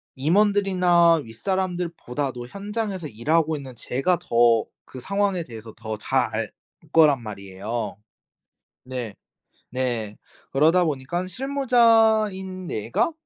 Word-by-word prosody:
임원들이나 180 0 +3
윗사람들보다도 150 - -3
현장에서 200 - -4
일하고 155 +7 +1
있는 135 -4 -8
제가 135 +9 0
더 115 -1 +3 0.2
그 130 - -10
상황에 200 +3 0
대해서 110 -2 -10
더 110 -1 -5
잘 105 - +1
알 - - -2 0.4
거란 150 -5 +5
말이에요. 105 +2 -5 0.9
네. 125 -5 -5 0.6
네. 120 -5 -2 0.4
그러다 160 +6 +4
보니까 155 +4 -2
'실무자인 225 -6 +2
내가 115 - -1
160 Hz, 245 characters per minute, -24 LUFS, 120-190 Hz, 0.9 s, 거란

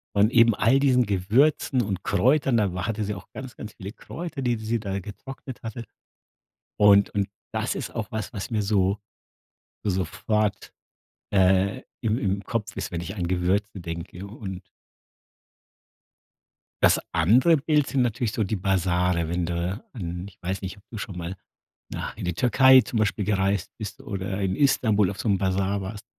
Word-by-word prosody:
Und 105 +3 +4
eben 115 -3 +5
all 120 +6 +4
diesen 130 -3 +4
Gewürzen 120 +8 +2
und 100 -4 -3
Kräutern, 130 +5 +3
da 100 -5 +1
wa 90 +1 -3
hatte 110 -1 -1
sie 105 0 -2
auch 95 - -11
ganz, 130 -2 -8
ganz 105 - -8
viele 100 -1 -8
Kräuter, 140 +7 -7
die 125 -2 +1
s 110 - -7
sie 115 +1 -1
da 100 -2 -3
getrocknet 125 +6 -9
hatte. 115 +1 -5 1.0
Und 100 -1 +6
und 100 -1 -1 0.2
das - - -1
ist - - -5
auch 115 0 -4
was 110 +2 -4
was 100 +2 -5
mir 110 -2 +1
so, 100 -1 +2 0.9
sofort, 100 +2 -1 0.6
äh, 95 +5 +3 0.2
im 110 0 +1
im 100 -2 -1
Kopf 115 -2 -3
ist, - - -4
wenn 85 - -3
ich 85 +3 -6
an 90 -3 -2
Gewürzen 95 +2 0
denke 85 +2 -6
und 100 -3 -7 2.2
das - - +5
andere 120 - +5
Bild 150 0 +2
sind 135 - +1
natürlich 120 -1 0
so 110 - 0
die 105 +2 -1
Basare, 90 -3 +1
wenn 85 0 -1
du 90 +5 -3
an 90 -5 -5
ich 100 - -15
weiß 95 +2 -3
nicht, 95 +1 -6
ob 100 - -19
du 115 - -6
schon 100 -3 -6
mal 85 +2 -5 0.5
na - - -4
in - - -7
die 90 - -1
Türkei 130 +7 +6
zum 120 - -3
Beispiel 105 -1 0
gereist 100 -2 0
bist 110 +5 -6
oder 100 -5 -4
in 95 -1 0
Istanbul 110 -8 +3
auf 100 - -9
so 105 - -3
'n 100 - +3
Basar 95 +1 0
warst. 105 +3 -7
100 Hz, 175 wpm, -25 LUFS, 95-115 Hz, 2.2 s, Und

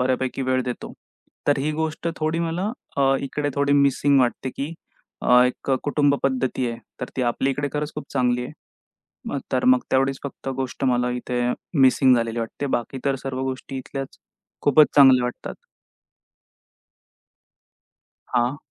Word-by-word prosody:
बऱ्यापैकी 130 +1 0
वेळ 130 0 +1
देतो. 125 -1 -5 0.5
तर 145 -1 +3
ही 150 +3 0
गोष्ट 160 +2 -2
थोडी 155 +1 -1
मला 170 +5 -1 0.3
अ, 135 -1 +3
इकडे 145 +1 -2
थोडी 140 0 +1
मिसिंग 140 0 +4
वाटते, 125 +1 0
की 140 +5 -5 0.5
अ, 125 0 +6
एक 125 +2 -2
कुटुंब 145 -1 +2
पद्धती 130 -1 0
आहे. 115 - -7 0.2
तर 125 - -2
ती 130 - 0
आपल्याकडे 135 +4 0
खरंच 150 0 -3
खूप 150 - -5
चांगली 125 -2 +1
आहे. 130 - -8 0.7
मग - - -2
तर - - +1
मग 255 0 +5
तेवढीच 135 0 +2
फक्त 135 -1 -6
गोष्ट 135 +1 -3
मला 125 -1 +2
इथे 125 0 -2 0.4
मिसिंग 130 0 +5
झालेली 115 0 -1
वाटते. 115 +5 -4
बाकी 130 +1 -2
तर 140 - +2
सर्व 130 -1 -3
गोष्टी 130 +1 -4
इथल्याच, 135 +1 -7 0.4
खूपच 145 +1 +6
चांगल्या 130 -3 +7
वाटतात. 125 - -5 2.8
हां. 125 +3 +1
135 Hz, 150 wpm, -23 LUFS, 125-145 Hz, 2.8 s, चांगल्या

